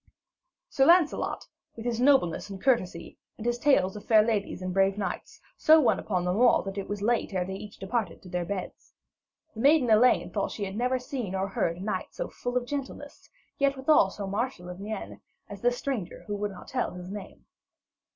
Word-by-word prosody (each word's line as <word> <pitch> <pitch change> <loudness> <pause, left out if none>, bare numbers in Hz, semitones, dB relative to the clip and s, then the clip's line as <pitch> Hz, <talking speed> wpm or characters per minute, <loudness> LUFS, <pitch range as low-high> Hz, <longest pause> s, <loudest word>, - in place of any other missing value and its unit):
Sir 270 - +2
Lancelot, 340 -3 +3 0.3
with 230 - -8
his 240 -1 -1
nobleness 255 - +3
and 195 -1 -7
courtesy, 185 -9 0 0.2
and 225 - -8
his 240 0 0
tales 240 -9 +3
of 205 - -8
fair 215 -2 +5
ladies 215 -3 -1
and 185 0 -3
brave 195 +1 +2
knights, 210 - -5 0.2
so 315 0 +6
won 275 - +3
upon 180 -4 -2
them 180 +2 0
all, 245 +1 +5
that 195 0 -5
it 195 - -6
was 205 0 -4
late 230 -3 0
ere 180 -1 0
they 190 - -5
each 205 +1 -9
departed 200 -2 -3
to - - -12
their 180 0 -2
beds. 185 +1 -6 0.6
The 220 - -10
maiden 275 -2 +4
Elaine 235 +4 +4
thought 200 -2 0
that - - -8
she 205 - -3
had 190 0 -6
never 250 +3 +1
seen 250 - -4
or 190 +1 -1
heard 170 -3 -1
of 185 - -7
a - - -6
knight 215 - -3
so - - -4
full 245 0 -3
of 245 - -1
gentleness, 280 +1 -6 0.3
yet 275 -1 +2
withal 265 -7 +4
so 200 +1 -6
martial 200 -2 -3
of 180 +1 -8
mien, 210 +1 -6 0.3
as 200 -1 -9
this 245 0 +2
stranger 245 -11 -4
who 205 - -3
would 205 0 -2
not 190 -3 -11
tell - - -2
his 180 +1 -8
name. 205 -1 -9
210 Hz, 215 wpm, -28 LUFS, 195-250 Hz, 0.6 s, so